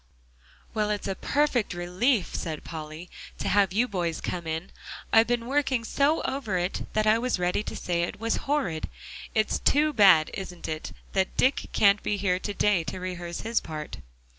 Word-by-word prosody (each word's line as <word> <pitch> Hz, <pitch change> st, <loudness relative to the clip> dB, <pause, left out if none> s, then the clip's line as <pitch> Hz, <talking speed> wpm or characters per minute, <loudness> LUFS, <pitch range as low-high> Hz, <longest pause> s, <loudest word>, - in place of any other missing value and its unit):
"Well, 215 Hz, -1 st, 0 dB
it's 205 Hz, -1 st, -2 dB
a 195 Hz, -, 0 dB
perfect 260 Hz, -2 st, 0 dB
relief," 185 Hz, +6 st, +1 dB
said 155 Hz, -2 st, -4 dB
Polly, 155 Hz, +1 st, -7 dB, 0.3 s
"to -, -, -3 dB
have 200 Hz, -2 st, +3 dB
you 230 Hz, +6 st, +2 dB
boys 175 Hz, -6 st, -2 dB
come 175 Hz, -2 st, -4 dB
in. 160 Hz, +4 st, -4 dB, 0.4 s
I've 225 Hz, 0 st, +6 dB
been 240 Hz, -1 st, 0 dB
working 265 Hz, -2 st, +1 dB
so 285 Hz, +7 st, +1 dB
over 235 Hz, -9 st, -2 dB
it 180 Hz, +2 st, -2 dB
that 215 Hz, 0 st, +2 dB
I 215 Hz, +1 st, +4 dB
was 250 Hz, -1 st, 0 dB
ready 180 Hz, +2 st, 0 dB
to -, -, -6 dB
say 170 Hz, -1 st, -1 dB
it 175 Hz, -, -3 dB
was 230 Hz, 0 st, 0 dB
horrid. 190 Hz, -, 0 dB, 0.5 s
It's 215 Hz, -1 st, +1 dB
too 300 Hz, +1 st, +3 dB
bad, 190 Hz, -, +6 dB
isn't 180 Hz, -3 st, -6 dB
it, 155 Hz, 0 st, -4 dB, 0.2 s
that 190 Hz, -1 st, 0 dB
Dick 265 Hz, +2 st, +2 dB
can't 200 Hz, 0 st, +4 dB
be 205 Hz, -, -1 dB
here 185 Hz, -2 st, +1 dB
to 205 Hz, -, -4 dB
day 200 Hz, -5 st, +2 dB
to 185 Hz, -, -5 dB
rehearse 175 Hz, -2 st, -5 dB
his 230 Hz, +1 st, +1 dB
part?" 155 Hz, -1 st, -7 dB
200 Hz, 185 wpm, -27 LUFS, 175-230 Hz, 0.5 s, I've